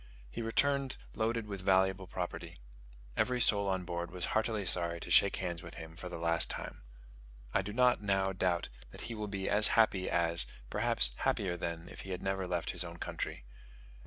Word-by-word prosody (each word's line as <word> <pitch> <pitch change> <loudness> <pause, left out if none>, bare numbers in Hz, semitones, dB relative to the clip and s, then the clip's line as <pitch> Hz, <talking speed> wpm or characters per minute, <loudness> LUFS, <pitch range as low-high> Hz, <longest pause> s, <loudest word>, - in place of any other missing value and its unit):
He - - -4
returned 135 +4 +1 0.2
loaded 115 0 -1
with 100 -3 -6
valuable 95 0 +2
property. - - -5 0.6
Every 125 0 +1
soul 100 -3 +4
on 95 -2 -1
board 85 -1 -3
was 90 -1 -2
heartily 110 -2 0
sorry 85 -1 0
to - - -7
shake 100 - +6
hands 85 -3 -3
with 85 - -10
him 80 0 -9
for 90 +1 -7
the 90 - -5
last 85 0 +3
time. - - -5 0.7
I - - +3
do 100 +2 -5
not 125 +1 +3
now 95 -1 +1
doubt 90 -2 0 0.2
that - - -11
he 115 - -5
will 105 -1 -4
be 100 -1 -3
as 105 +1 +7
happy 100 -4 +3
as, 85 0 +2 0.2
perhaps - - +3
happier 95 -3 0
than, 85 -1 -4
if - - -10
he 95 - -9
had 90 -1 -4
never 95 -1 -1
left 90 -1 -1
his - - -2
own 85 -1 -8
country. - - -5
95 Hz, 190 wpm, -33 LUFS, 85-105 Hz, 0.7 s, as